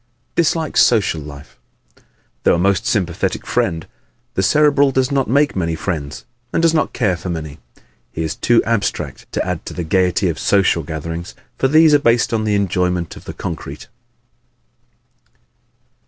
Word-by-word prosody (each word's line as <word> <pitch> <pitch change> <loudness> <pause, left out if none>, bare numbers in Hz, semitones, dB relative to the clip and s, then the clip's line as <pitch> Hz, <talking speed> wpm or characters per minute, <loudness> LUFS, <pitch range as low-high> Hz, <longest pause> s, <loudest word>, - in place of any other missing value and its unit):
Dislikes 160 -1 +2
Social 100 -9 +2
Life 70 -1 -12 0.4
¶ - - -26 0.4
Though - - +3
a - - 0
most 100 +4 +1
sympathetic 90 -7 -1
friend, 80 -1 -1 0.5
the - - 0
Cerebral 145 +6 +4
does 130 +1 0
not 135 -2 +1
make 145 +4 +2
many 85 -3 -1
friends 70 -6 -4 0.3
and - - 0
does 165 -1 +3
not 155 - +1
care 100 -7 0
for 90 +1 -7
many. 80 -3 -5 0.5
He 80 - -3
is 80 - -2
too 120 -1 +3
abstract 115 -3 -2
to - - -1
add - - -3
to - - -7
the 90 - -3
gaiety 90 +3 +1
of 85 - -2
social 95 -4 +2
gatherings, 80 +2 -6 0.2
for 135 - +3
these 155 +2 +5
are 145 - +6
based 115 -3 +2
on 110 -1 0
the 105 -1 +1
enjoyment 90 -3 -1
of - - -13
the - - -6
concrete. - - -7
95 Hz, 165 wpm, -18 LUFS, 85-130 Hz, 0.5 s, are